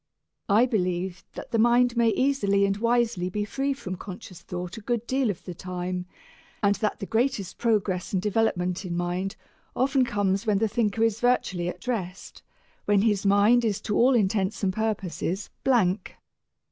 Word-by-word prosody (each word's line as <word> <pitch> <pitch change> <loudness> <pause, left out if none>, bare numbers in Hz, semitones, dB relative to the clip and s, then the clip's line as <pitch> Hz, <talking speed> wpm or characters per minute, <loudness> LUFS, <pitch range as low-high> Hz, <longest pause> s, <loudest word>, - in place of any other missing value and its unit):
I 215 +5 +5
believe 180 -5 -2
that - - -8
the 230 - +1
mind 240 +1 +4
may 235 -1 +4
easily 210 -6 +2
and 195 0 0
wisely 230 -4 +1
be 205 +2 -2
free 270 +6 -1
from 185 -9 -5
conscious 185 -2 -9
thought 180 +2 -6
a - - -7
good 235 +1 -2
deal 260 -1 +1
of 195 - -4
the 180 - -6
time, 180 0 -4 0.6
and 200 0 +4
that 215 -2 -1
the 200 - -5
greatest 225 -3 -1
progress 205 -5 0
and 190 - +1
development 190 -3 0
in 175 -2 -3
mind 180 +2 -2 0.4
often 265 +1 +2
comes 205 -2 0
when 210 -2 +3
the 220 +2 +2
thinker 220 0 0
is 225 -1 +1
virtually 195 -8 +1
at - - -9
rest, 195 -7 -4 0.4
when 205 -1 +3
his 205 -3 +1
mind 205 +5 +5
is 210 -4 0
to 210 - -2
all 255 +2 +5
intents 205 -1 0
and 190 -1 +1
purposes 195 -3 -2
blank. 215 -7 +1
205 Hz, 170 wpm, -26 LUFS, 185-235 Hz, 0.6 s, I